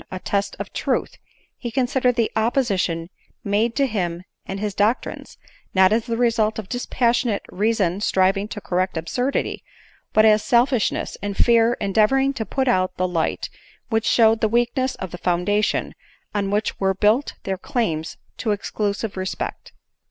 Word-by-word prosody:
25 185 - -5
a - - -33
test 200 0 -1
of - - -7
truth, - - -1 0.4
he 240 - -4
considered 250 0 +1
the 230 -2 +1
opposition 210 -8 0 0.4
made 215 +3 +1
to 280 - +3
him 180 -7 -2 0.2
and 195 - -4
his 210 -1 -2
doctrines, 210 +6 -1 0.4
not 190 +2 +5
as 225 +2 0
the 230 -1 -1
result 225 -3 +2
of 215 -4 -5
dispassionate 240 -2 0
rea 210 +4 +1
son 195 -3 0
striving 195 0 +2
to 215 - -6
correct 185 -2 -1
absurdity, 245 +12 -2 0.5
but 215 - +5
as 215 -1 +5
selfishness 245 -1 +1
and' 200 0 -4
fear 235 0 +4
endeavoring 220 +7 +2
to 225 -5 -4
put 265 -1 -1
out 185 -6 +1
the 185 - +1
light 170 -3 -1 0.4
which 225 -1 0
showed 225 -1 +4
the 220 - +2
weakness 240 +3 +1
of 190 -3 -6
the 175 - -7
foundation 205 +4 0 0.4
on 200 -2 -1
which 210 +2 -1
were 190 0 +1
built 215 +8 +2
their 190 -1 -3
claims 165 -12 -2 0.2
to 225 - -3
exclusive 205 0 -2
respect. 185 0 -4
215 Hz, 160 wpm, -22 LUFS, 190-235 Hz, 0.5 s, not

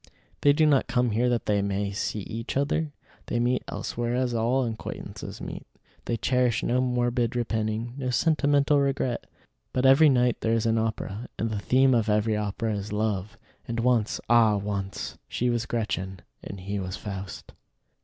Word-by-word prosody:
They 145 - +6
do 155 +2 +3
not 145 -3 +3
come 125 -1 +1
here 120 +4 +2
that 120 -1 0
they 105 -1 +2
may 100 0 -1
see 105 +1 -2
each 115 +5 -4
other. 145 +2 0 0.4
They 120 - 0
meet 125 +1 +1
elsewhere 120 0 -3
as 125 -1 0
all 120 +3 +1
acquaintances 110 -2 -6
meet. - - -7 0.4
They 115 - -1
cherish 125 0 +1
no 125 +1 +2
morbid 120 -1 0
repining, 110 0 -1
no 130 -2 -2
sentimental 145 +3 +3
regret. 135 -3 -1 0.5
But 130 +1 +1
every 140 +4 +7
night 125 -2 +2
there 115 - +1
is 115 - 0
an 115 0 +2
opera, 110 0 -3
and 115 0 -1
the 105 - -2
theme 130 +4 +4
of 115 -2 +2
every 105 +1 +2
opera 105 +2 -2
is 100 0 -4
love; 105 -2 -2 0.3
and 115 0 -2
once, 120 -3 +2
ah! 115 -3 +5
once, 100 -1 -4
she 125 0 0
was 120 -1 -1
Gretchen 95 -5 -2 0.2
and 100 -2 -7
he 100 +2 -3
was 90 -1 -4
Faust. 95 -2 -7
115 Hz, 175 wpm, -26 LUFS, 105-125 Hz, 0.5 s, every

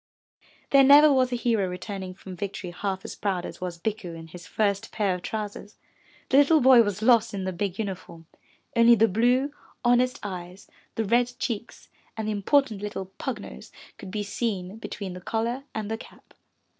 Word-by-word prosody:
There 275 -1 +7
never 290 +2 +8
was 255 -1 +2
a - - 0
hero 230 -5 +1
returning 185 0 -6
from 190 -1 -10
victory 190 -1 -5
half 190 +1 -4
as - - -6
proud 190 -4 -2
as - - -9
was 180 -2 -4
Bikku 200 -2 -4
in 165 0 -10
his 175 +2 -11
first 205 0 -1
pair 205 -4 0
of 180 - -5
trousers. 210 0 -6 0.5
The 265 - +4
little 290 +3 +6
body 255 -2 +7
was 205 -1 -1
lost 230 -3 +4
in 195 - -3
the 185 0 -2
big 190 +1 -3
uniform, 180 -5 -6 0.5
only 235 0 +7
the 225 +1 +4
blue, 245 +7 +2 0.3
honest 250 +2 +3
eyes, 185 -1 -7 0.3
the 225 - -1
red 240 +3 +2
cheeks 230 -3 -5 0.3
and 220 -1 -3
the - - 0
important 215 +1 +1
little 195 -2 -5
pug - - -3
nose 65 +1 -11 0.3
could 195 - -8
be 205 +2 -3
seen 205 -2 -3
between 200 -4 -6
the 180 - -9
collar 235 +7 -2
and 215 -1 -3
the 225 - -3
cap. - - -15
210 Hz, 185 wpm, -26 LUFS, 190-235 Hz, 0.5 s, never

